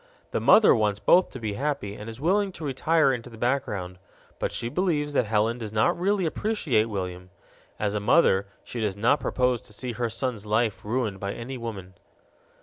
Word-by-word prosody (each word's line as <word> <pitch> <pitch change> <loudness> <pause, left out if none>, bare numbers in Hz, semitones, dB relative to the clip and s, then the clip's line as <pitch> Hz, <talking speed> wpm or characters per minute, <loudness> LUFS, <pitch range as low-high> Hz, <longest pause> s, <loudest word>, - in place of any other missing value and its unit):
The - - 0
mother 220 - +7
wants 105 -4 +1
both 180 +1 +4
to 130 - -9
be 110 -3 -3
happy 135 -4 -2
and 105 +2 -8
is 115 +1 -9
willing 195 +6 +1
to 160 - -7
retire 145 +1 +2
into 125 -1 -5
the 115 - -12
background, 105 -8 -2 0.4
but - - -1
she 115 - -3
believes 150 -1 0
that 125 -5 +2
Helen 110 +3 +1
does 110 -3 -6
not 110 0 +2
really 190 +1 +1
appreciate 160 - 0
William; 90 -4 -5 0.5
as 105 -1 0
a 105 - 0
mother 100 - +3 0.2
she 120 - -5
does 105 -2 -1
not 120 +8 +3
propose 125 -1 0
to - - -13
see 125 +4 -4
her 120 0 -2
son's 115 -2 -3
life 110 0 0
ruined 110 -3 -2
by 100 +1 -3
any 125 +3 -6
woman. 105 -6 -7
115 Hz, 195 wpm, -26 LUFS, 105-140 Hz, 0.5 s, mother